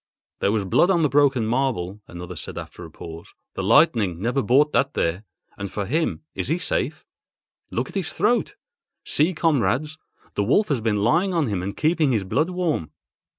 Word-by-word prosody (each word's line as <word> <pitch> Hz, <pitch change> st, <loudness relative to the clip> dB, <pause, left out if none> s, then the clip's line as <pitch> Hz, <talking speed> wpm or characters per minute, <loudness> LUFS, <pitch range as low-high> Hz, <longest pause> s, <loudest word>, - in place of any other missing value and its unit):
"There 100 Hz, -, +2 dB
was 105 Hz, -2 st, 0 dB
blood 135 Hz, -, +3 dB
on 175 Hz, -4 st, +3 dB
the 150 Hz, -, +3 dB
broken 140 Hz, -4 st, +3 dB
marble," 110 Hz, -6 st, -1 dB
another 90 Hz, +1 st, -8 dB
said 75 Hz, -, -7 dB
after -, -, -8 dB
a -, -, -9 dB
pause—"the 85 Hz, +3 st, -10 dB
lightning 110 Hz, -, +3 dB
never 120 Hz, +7 st, 0 dB
brought 140 Hz, +7 st, +3 dB
that 140 Hz, +2 st, +1 dB
there. 90 Hz, +6 st, -1 dB, 0.3 s
And 100 Hz, -1 st, -5 dB
for 105 Hz, -, -3 dB
him—is 155 Hz, -, -2 dB
he 160 Hz, -, +1 dB
safe? 155 Hz, -3 st, -2 dB, 0.6 s
Look 120 Hz, +3 st, -2 dB
at -, -, -12 dB
his 190 Hz, -5 st, -2 dB
throat! 225 Hz, +7 st, +1 dB, 0.5 s
See, 165 Hz, +5 st, +1 dB
comrades, 155 Hz, 0 st, +1 dB, 0.3 s
the 100 Hz, -, 0 dB
wolf 155 Hz, -, +2 dB
has 135 Hz, -6 st, 0 dB
been 105 Hz, -2 st, 0 dB
lying 180 Hz, -, +2 dB
on 165 Hz, -3 st, +2 dB
him 100 Hz, -4 st, -1 dB
and 100 Hz, +2 st, -5 dB
keeping 155 Hz, -3 st, +2 dB
his 105 Hz, -4 st, +1 dB
blood 140 Hz, -, 0 dB
warm." 175 Hz, -, -1 dB
130 Hz, 180 wpm, -23 LUFS, 100-155 Hz, 0.6 s, blood